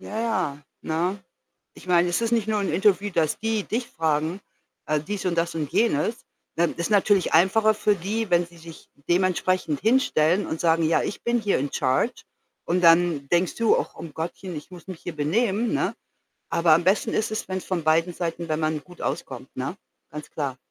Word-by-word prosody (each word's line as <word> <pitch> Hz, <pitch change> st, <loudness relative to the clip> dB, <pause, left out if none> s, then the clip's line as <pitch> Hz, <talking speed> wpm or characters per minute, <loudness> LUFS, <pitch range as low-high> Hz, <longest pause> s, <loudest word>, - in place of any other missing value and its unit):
Ja, 215 Hz, -, -5 dB
ja, 185 Hz, -11 st, -1 dB, 0.2 s
ne? 175 Hz, +5 st, -1 dB, 0.5 s
Ich -, -, -15 dB
meine, 175 Hz, 0 st, +4 dB
es 175 Hz, +6 st, 0 dB
ist 230 Hz, 0 st, 0 dB
nicht 225 Hz, -3 st, +1 dB
nur 215 Hz, -1 st, +1 dB
'n 195 Hz, -4 st, -1 dB
Interview, 195 Hz, +2 st, +2 dB
dass 160 Hz, -4 st, +1 dB
die 220 Hz, -2 st, -1 dB
dich 235 Hz, +2 st, -3 dB
fragen, 160 Hz, +3 st, -1 dB, 0.5 s
äh, 155 Hz, 0 st, +1 dB
dies 195 Hz, +6 st, -5 dB
und 175 Hz, -2 st, 0 dB
das 170 Hz, 0 st, -1 dB
und 150 Hz, -3 st, -3 dB
jenes. 225 Hz, 0 st, +1 dB, 0.3 s
Ähm, 170 Hz, 0 st, +2 dB
ist 170 Hz, -, -2 dB
natürlich 205 Hz, -3 st, +3 dB
einfacher 215 Hz, +6 st, +4 dB
für 210 Hz, -1 st, +1 dB
die, 205 Hz, +4 st, -3 dB
wenn 175 Hz, 0 st, +3 dB
sie 170 Hz, 0 st, -18 dB
sich 165 Hz, 0 st, -13 dB, 0.2 s
dementsprechend 180 Hz, -3 st, +1 dB
hinstellen 205 Hz, -, +2 dB
und 160 Hz, -, -4 dB
sagen: 165 Hz, -1 st, +2 dB
„Ja, 160 Hz, +1 st, +3 dB
ich -, -, -5 dB
bin 235 Hz, 0 st, +1 dB
hier 205 Hz, -3 st, +1 dB
in 140 Hz, +1 st, -3 dB
charge.“ 135 Hz, -, 0 dB, 0.4 s
Und 180 Hz, +2 st, +1 dB
dann 165 Hz, -4 st, +4 dB
denkst 175 Hz, +1 st, +1 dB
du: 230 Hz, -1 st, +3 dB
„Ach -, -, -3 dB
um 160 Hz, -3 st, -9 dB
Gottchen, 170 Hz, +2 st, -5 dB
ich 150 Hz, -, -8 dB
muss 180 Hz, 0 st, -12 dB
mich 185 Hz, -3 st, -8 dB
hier 175 Hz, -, -6 dB
benehmen“, 205 Hz, +9 st, 0 dB
ne? -, -, 0 dB, 0.6 s
Aber 170 Hz, -1 st, +3 dB
am 170 Hz, +2 st, +4 dB
besten 190 Hz, +3 st, +2 dB
ist 215 Hz, -, 0 dB
es, 215 Hz, -, -3 dB
wenn's 185 Hz, -1 st, -3 dB
von 185 Hz, -3 st, -2 dB
beiden 165 Hz, +3 st, +2 dB
Seiten 170 Hz, -1 st, -4 dB
wenn 155 Hz, 0 st, -1 dB
man 155 Hz, -1 st, -1 dB
gut 180 Hz, -1 st, -16 dB
auskommt, -, -, -5 dB
ne? -, -, -3 dB, 0.3 s
Ganz 150 Hz, +1 st, -8 dB
klar. 140 Hz, -4 st, -3 dB
175 Hz, 200 wpm, -24 LUFS, 160-205 Hz, 0.6 s, meine